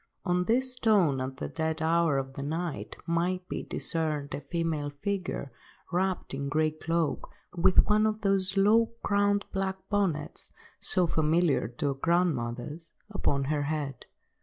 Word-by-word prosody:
On 180 -1 +1
this 255 +4 +3
stone, 200 - +3
at 130 0 -4
the - - -4
dead 160 0 -2
hour 165 -2 +2
of 135 0 -3
the 140 - -6
night, 160 +2 -3
might 180 +2 0
be - - -3
discerned 155 -4 -1
a 140 - -4
female 155 0 -2
figure, 180 -1 -3 0.4
wrapped 185 -2 -1
in 140 +1 -3
a - - -3
grey 155 +1 +2
cloak, 165 +1 -1 0.3
with 175 +2 +5
one 215 +1 +3
of 215 0 -2
those 195 -1 +2
low–crowned 205 -1 +3
black 190 0 -1
bonnets, 195 -7 -1 0.3
so 180 - +3
familiar 160 -3 +2
to 120 +5 -2
our - - 0
grandmothers, 150 -1 -1 0.2
upon 140 -9 0
her 145 +2 0
head. 145 -3 -4
165 Hz, 150 wpm, -29 LUFS, 145-190 Hz, 0.4 s, with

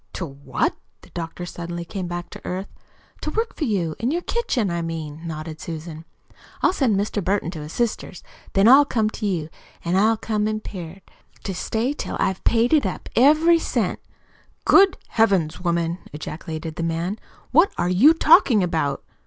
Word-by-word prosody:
"To 180 - -4
what?" 140 -2 -2 0.3
The - - -18
doctor 170 +1 -5
suddenly 170 0 -6
came 185 0 -5
back 175 0 -5
to - - -10
earth. 185 +2 -5 0.5
"To - - -3
work 450 +1 -2
for 310 - -2
you 180 - -1
in 235 - 0
your 345 +4 -1
kitchen, 250 - -1
I 170 0 -1
mean," 160 -2 -5
nodded 155 -1 -6
Susan. 160 -1 -7 0.6
"I'll - - +4
send 255 - +2
Mr. 205 0 -2
Burton 190 -3 0
to 160 -4 -7
his 150 +2 -8
sister's, 235 -5 -2 0.3
then 195 +2 +4
I'll 270 +4 +9
come 220 -6 0
to 210 - -3
you, 170 -6 -1 0.4
an' 170 +2 +1
I'll 220 +3 +4
come 215 -1 -1
impaired 195 -4 -6 0.4
to 195 - -3
stay 225 +8 -1
till - - -5
I've 190 -1 0
paid 235 +3 +3
it 305 - +5
up 185 - -6
every 310 +6 +5
cent." - - -1 0.7
"Good 390 -1 +6
Heavens, 190 -8 +2
woman!" 170 0 0
ejaculated 155 +1 -6
the - - -3
man. 165 +5 -2 0.3
"What 330 +8 +5
are 175 - 0
you 250 - +6
talking 290 - +5
about?" 160 -6 -1
185 Hz, 175 wpm, -23 LUFS, 165-230 Hz, 0.7 s, I'll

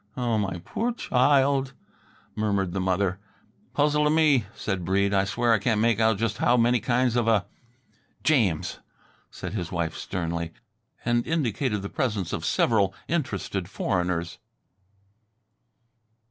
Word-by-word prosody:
"Oh, 120 -3 0
my 95 -4 -2
poor 235 +2 -1
child," 135 - +2 0.6
murmured 100 -4 0
the 95 - -1
mother. 95 0 0 0.6
"Puzzle 150 +1 +3
t' - - +4
me," 150 -7 +4
said 95 -4 -3
Breede. 100 +3 +1
"I 100 0 +3
swear 115 +4 +1
I 110 - +3
can't 110 +1 +1
make 115 -1 +2
out 110 -2 +3
just 110 0 -2
how 125 - +3
many 120 +1 +3
kinds 120 +2 +1
of 120 -2 +1
a 110 -4 +3 0.4
" - - -37
"James!" 105 - +1 0.5
said - - -7
his 90 -5 -4
wife 85 -2 -2
sternly, 85 -2 -4 0.5
and 120 0 +1
indicated 125 -8 -1
the - - -3
presence 110 - -2
of - - -3
several 100 -4 +2
interested 100 - -2
foreigners. 90 -3 -2
110 Hz, 140 wpm, -26 LUFS, 95-125 Hz, 0.6 s, t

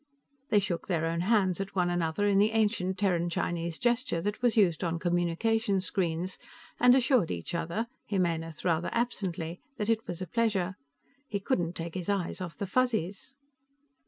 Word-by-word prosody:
They 210 - +4
shook 190 -4 -1
their 165 -4 0
own 165 +1 -1
hands 195 -2 +2
at 195 0 -6
one 175 -2 +2
another 175 +3 0
in 200 -1 +4
the 215 +2 +3
ancient 205 -4 +1
Terran 175 -3 +1
Chinese 170 -1 -2
gesture 240 -5 +1
that 205 +5 -3
was 240 -2 +2
used 180 -6 +3
on 170 -1 0
communication 180 +5 +1
screens, 185 -1 -1 0.4
and 250 +1 +7
assured 255 - +3
each 85 - -4
other 170 +6 -1 0.2
Jimenez 165 -5 -1
rather 170 -1 +1
absently 180 -8 -2 0.2
that 210 +1 -2
it 225 0 +1
was 175 - -5
a 185 - -3
pleasure. 200 -4 0 0.5
He 200 - -2
couldn't 175 -6 0
take 165 0 -5
his 185 0 -4
eyes 195 -3 -1
off 175 -2 -6
the 200 - -2
Fuzzies. 220 0 -1
185 Hz, 170 wpm, -29 LUFS, 170-215 Hz, 0.5 s, and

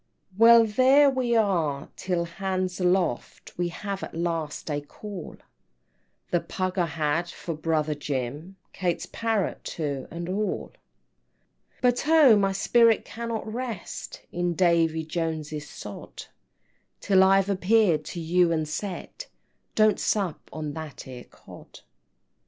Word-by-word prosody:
"Well, 230 +2 +7
there 265 +6 +5
we 250 -3 0
are 165 -10 +1
till 180 -2 -1
'hands 185 +1 -3
aloft,' 180 -8 -1
We 175 0 -1
have 195 +3 -5
at - - -7
last 165 -2 -3
a 145 0 -1
call; 190 +5 -9 0.9
The 175 - +3
pug 185 +2 -3
I 175 - +2
had 160 +2 -1
for 170 - -6
brother 155 -1 0
Jim, 145 +5 -4 0.2
Kate's 175 -3 -1
parrot 225 -4 -2
too, 145 -4 -4
and 170 0 -6
all." 205 +3 -2
IX. - - -30 1.0
"But 245 +2 +2
oh, 310 -7 +7
my 195 -1 +2
spirit 230 +3 +3
cannot 230 -1 -5
rest 235 -6 -6
In 175 -1 -1
Davy 165 -3 +2
Joneses 155 -2 -4
sod, 105 -1 -9 0.7
Till 190 -2 +4
I've 195 0 +4
appeared 195 -4 +3
to 175 - -6
you 170 +1 +2
and 155 -2 0
said 200 - -6 0.5
Don't 215 -1 +4
sup 195 -7 -1
on 155 -2 -5
that 155 -3 -8
'ere 125 -2 -9
Cod!" - - -15
180 Hz, 130 wpm, -26 LUFS, 160-210 Hz, 1.0 s, Well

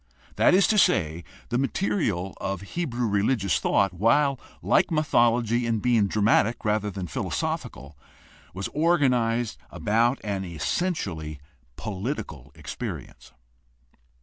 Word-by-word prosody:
That - - +5
is 195 - +5
to 215 - +4
say, 85 - +2 0.3
the 120 0 0
material 130 - -1
of 95 -2 -3
Hebrew 125 - -3
religious 100 -1 +1
thought, 100 -2 +2
while 130 - +2 0.2
like - - +3
mythology 120 -6 +2
in 115 -1 +1
being 110 -2 +2
dramatic 110 +3 +2
rather 105 -1 +1
than 95 -2 -5
philosophical, 70 -2 -4 0.6
was 95 +1 -4
organized 125 -8 +1
about 115 +5 +1
an 100 -2 -2
essentially 80 - -3 0.4
political 100 - -5
experience. - - -7
115 Hz, 110 wpm, -25 LUFS, 95-130 Hz, 0.6 s, That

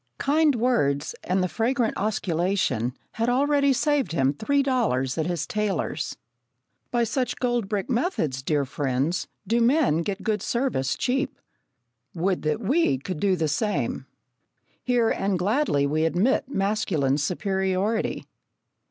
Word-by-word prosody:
Kind 300 0 +3
words 220 - +1
and 185 +1 +1
the - - +1
fragrant 230 - 0
osculation 180 - 0 0.2
had 230 +2 -1
already 280 +2 +3
saved 285 - +1
him 135 -3 +2
three 280 - +1
dollars 205 - 0
at 160 0 -1
his 175 -3 -2
tailor's. 210 -2 -2 0.7
By 240 -1 +1
such 250 +2 -1
gold 240 -5 -1
brick 205 -3 -1
methods, 235 - -1
dear 145 0 0
friends, 140 +4 -1 0.2
do 235 +2 +1
men 240 - +3
get 195 +3 -4
good 215 -3 0
service 235 - 0
cheap. 270 +2 -1 0.8
Would 180 +2 0
that 155 +7 -1
we 260 - +2
could 150 +4 -5
do 195 0 +2
the 160 -3 0
same! 205 +8 -1 0.8
Here, 245 -2 +2
and 195 -1 0
gladly, 195 - +1
we 155 +3 +1
admit 200 +11 +1
masculine 195 - 0
superiority. 190 +5 -1
200 Hz, 135 wpm, -25 LUFS, 160-245 Hz, 0.8 s, Kind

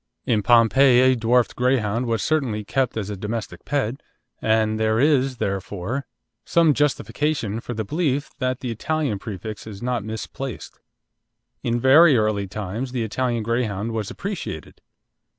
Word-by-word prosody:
In 110 -3 +2
Pompeii 120 +3 +5
a - - +2
dwarfed 120 +1 +2
Greyhound 125 -2 +1
was 115 -3 0
certainly 130 -9 0
kept 130 0 0
as 105 -2 -3
a - - -3
domestic 105 -3 -5
pet, 135 -3 -1 0.4
and 110 0 +2
there 110 0 +2
is 135 -2 +2
therefore 100 +6 -3 0.4
some 165 -3 +3
justification 145 -5 -1
for 120 +1 -6
the 110 -1 -3
belief 145 - -1
that 130 -1 -1
the 125 - -3
Italian 140 -2 -1
prefix 105 0 -7
is 100 -3 -8
not 125 -3 -1
misplaced. 110 +4 -6 0.8
In 120 0 0
very 140 +3 +7
early 105 -2 0
times 105 +6 -5
the 120 -3 -1
Italian 120 +1 -1
Greyhound 115 -2 -1
was 110 -3 -3
appreciated. 175 - -6
115 Hz, 145 wpm, -23 LUFS, 110-130 Hz, 0.8 s, very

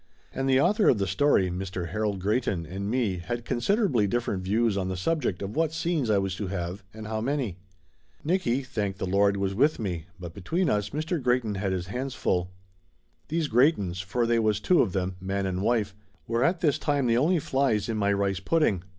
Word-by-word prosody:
And 135 0 -1
the 130 0 +5
author 200 +7 +4
of 120 - +4
the 100 - 0
story, 95 -1 +2
Mr. 90 -1 -4
Harold 105 +1 -1
Greyton, 100 -4 0
and 95 +4 -5
me 110 -7 0
had 120 +7 -4
considerably 130 - +1
different 110 -3 -1
views 105 +3 +1
on 95 -2 -1
the 95 -1 -3
subject 120 - -1
of 100 +2 -5
what 160 0 +1
scenes 160 -6 -1
I 105 - +4
was 95 -1 -1
to 105 - -3
have, 90 +1 -4
and 110 +1 -9
how 110 0 -3
many. 125 -7 -2 0.6
Nicky, 140 -7 +1
thank 105 -7 -3
the 95 - -3
Lord, 100 +1 +2
was 100 0 -1
with 145 +9 +3
me, 90 -6 -4
but 85 -2 -7
be 100 - -10
tween 170 - 0
us 105 -1 0
Mr. 155 +2 -2
Greyton 125 -3 +1
had 100 0 -2
his 90 -2 -2
hands 125 +6 -4
full. 90 -1 0 0.8
These 160 -1 -1
Greytons, 110 - +2
for 120 +6 -1
they 115 0 +2
was 110 -2 +1
two 180 +10 +4
of 95 - 0
them, 95 -1 -2
man 95 +1 -2
and 95 -1 -2
wife, 105 -2 +1 0.3
were 115 +1 0
at 170 +4 +1
this 150 -5 +2
time 145 -3 0
the 115 -1 +3
only 170 +7 +3
flies 135 -8 0
in 115 - -2
my 100 -1 +1
rice 100 -1 0
pudding. 105 - +1
105 Hz, 210 wpm, -27 LUFS, 95-135 Hz, 0.8 s, the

